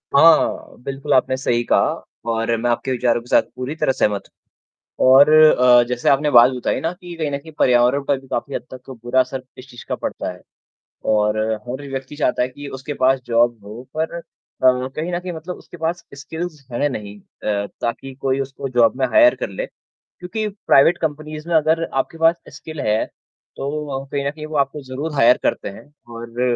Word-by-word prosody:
हाँ, 160 +2 +4
बिल्कुल, 135 +1 -2
आपने 130 0 +3
सही 120 -3 0
कहा - - +2 0.4
और 115 +1 0
मैं 120 - 0
आपके 120 +2 -1
विचारों 120 -2 +1
के 120 - -17
साथ - - +5
पूरी 130 +5 -4
तरह 135 - +1
सहमत 105 -6 0 0.8
हूँ। - - +4
और 140 +3 +8
अ, 125 -6 +7
जैसे 125 -1 0
आपने 145 +2 +3
बात 120 +1 +7
बताई 125 -2 -2
ना 165 - -1
कि 175 -1 -11
कहीं 155 -3 -2
न 140 - -1
कहीं 160 +2 -13
पर्यावरण 125 +2 +3
पर 140 -1 0
भी 135 - -18
काफ़ी 135 +3 -3
हद - - -4
तक 130 +1 -11
बुरा 125 +2 +1
असर 130 0 -1
इस 130 +1 -12
चीज़ 120 -1 -12
का - - 0
पड़ता - - -4
है। 90 - -13 0.7
और 105 0 +2 0.3
हर 130 +3 -5
व्यक्ति 135 +2 -6
चाहता 145 -4 0
है 125 - +2
कि 145 +2 -10
उसके 140 +3 -6
पास 130 0 +2
जॉब 120 0 +2
हो 110 +5 -9
पर 160 +1 -1
अ, - - -6 0.4
कहीं 130 +6 +1
न 175 - 0
कहीं 180 0 -6
मतलब 165 +3 -6
उसके 175 - -14
पास 165 +2 -3
स्किल्स 160 0 -7
हैं 145 +5 0
नहीं 105 -4 -7
अ, 100 +1 -4 0.2
ताकि 130 +3 -3
कोई 135 0 0
उसको 135 0 -5
जॉब 115 +1 +5
में 130 - +3
हायर 310 -1 +5
कर - - -4
ले। - - -4
क्योंकि 215 - -8
प्राइवेट 175 -5 +3
कंपनीज़ 155 0 -4
में 165 - +1
अगर 160 +1 +3
आपके 135 +4 -2
पास 165 +1 +4 0.2
स्किल 155 -1 -7
है, 110 0 +1 0.5
तो 140 - -4
वो 145 -3 -4
व - - -11
कहीं 140 -1 -2
न - - -1
कहीं 155 0 -8
वो 155 -1 -4
आपको 140 +1 0
ज़रूर 140 +4 -5
हायर 125 -2 +5
करते - - -1
हैं 115 +9 -13 0.2
और 115 +1 -6
135 Hz, 205 wpm, -20 LUFS, 125-155 Hz, 0.8 s, और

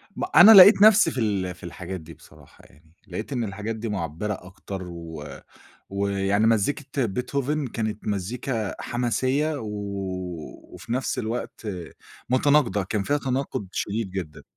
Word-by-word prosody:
ما - - -2
أنا 220 - +10
لقيت 200 +1 +10
نَفْسي 215 0 +7
في - - -8
ال 95 -4 -1
في - - -19
الحاجات 90 +1 -6
دي 80 +1 -12
بصراحة - - -19
يعني، 80 +4 -24
لقيت 105 +9 -5
إن 120 -2 -1
الحاجات 105 +2 -4
دي 110 0 -5
مُعبِّرة 95 +2 -3
أكتر 95 +1 -8
و 85 -3 -8 0.7
ويعني 100 +1 +1
مزّيكة 130 +4 0
Beethoven 135 +5 -2
كانت 110 -2 -3
مزّيكا 110 +2 -3
حماسيّة 130 +5 0
و 110 - -6 1.1
وفي 115 - -7
نَفْس 130 +1 -1
الوقت 115 -1 -4 0.6
متناقضة، 130 -5 +3
كان 100 +2 -2
فيها 145 +7 0
تناقُض 130 -6 -3
شديد 105 -1 -2
جدًا. 90 -6 -6
110 Hz, 140 wpm, -24 LUFS, 95-130 Hz, 1.1 s, أنا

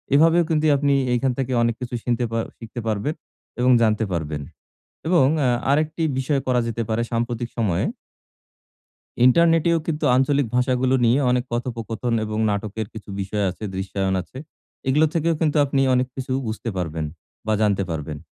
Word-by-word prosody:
এভাবেও 165 +3 +5
কিন্তু 155 -1 +1
আপনি 140 0 +2 0.2
এখান 130 +2 +1
থেকে 130 -1 -2
অনেক 115 -1 +1
কিছু 125 0 -4
শিখতে 120 0 0 0.3
শিখতে 115 +1 -8
পারবেন 110 +7 -1 0.5
এবং 125 +1 +4
জানতে 110 0 +2
পারবেন। 80 -4 -3 0.7
এবং 170 -5 +4
অ্যা 130 -4 +2 0.2
আরেকটি 155 +3 +1 0.2
বিষয় 135 +1 0
করা 125 -1 +3
যেতে 115 0 -2
পারে 110 +1 0
সাম্প্রতিক 120 0 -2
সময়ে 105 -7 +1 1.4
ইন্টারনেট 165 +4 +5
এও 165 - +3
কিন্তু 155 -1 -2
আঞ্চলিক 140 +1 +2
ভাষাগুলো 125 +1 +2
নিয়ে 120 +4 +4
অনেক 125 0 +1
কথোপকথন 115 -1 -2
এবং 110 0 -4
নাটকের 105 +1 -3
কিছু 110 -2 -9
বিষয় 100 +1 -1
আছে, 95 +4 -9
দৃশ্যায়ন 95 0 -1
আছে। 130 - -18 0.5
এগুলো 150 +4 +4
থেকেও 165 0 +1
কিন্তু 155 -2 +1
আপনি 140 -1 0
অনেক 125 0 +2
কিছু 130 -1 -4
বুঝতে 110 +1 -4
পারবেন, 80 -3 -2 0.4
বা 110 - +1
জানতে 100 -2 +2
পারবেন। 75 -2 -4
120 Hz, 155 wpm, -22 LUFS, 110-140 Hz, 1.4 s, এভাবেও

